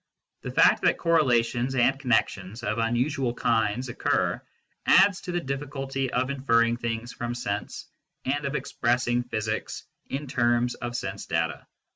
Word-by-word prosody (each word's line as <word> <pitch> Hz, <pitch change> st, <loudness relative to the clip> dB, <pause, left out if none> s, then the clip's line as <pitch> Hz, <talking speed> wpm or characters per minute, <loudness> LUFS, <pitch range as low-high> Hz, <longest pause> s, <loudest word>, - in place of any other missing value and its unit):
The -, -, -5 dB
fact -, -, +4 dB
that -, -, +3 dB
correlations 130 Hz, -6 st, +2 dB
and 135 Hz, +2 st, +3 dB
connections 110 Hz, -4 st, 0 dB
of 105 Hz, 0 st, -1 dB
un 115 Hz, +1 st, +1 dB
usual 130 Hz, -1 st, 0 dB
kinds 115 Hz, +1 st, +1 dB
occur 120 Hz, -, 0 dB, 0.5 s
adds 195 Hz, 0 st, +5 dB
to 180 Hz, -, -5 dB
the 175 Hz, -, 0 dB
difficulty 135 Hz, -2 st, -3 dB
of 130 Hz, +2 st, 0 dB
inferring 115 Hz, -4 st, +2 dB
things 115 Hz, 0 st, -4 dB
from 120 Hz, 0 st, -4 dB
sense 105 Hz, -4 st, -4 dB, 0.4 s
and 145 Hz, +2 st, -1 dB
of 140 Hz, +1 st, -2 dB
expressing 120 Hz, -1 st, 0 dB
physics 110 Hz, -3 st, -3 dB, 0.3 s
in 140 Hz, +2 st, -3 dB
terms 120 Hz, -2 st, +1 dB
of 120 Hz, -1 st, -6 dB
sense 100 Hz, -3 st, -4 dB
data. 80 Hz, -1 st, -2 dB
120 Hz, 145 wpm, -26 LUFS, 115-135 Hz, 0.5 s, adds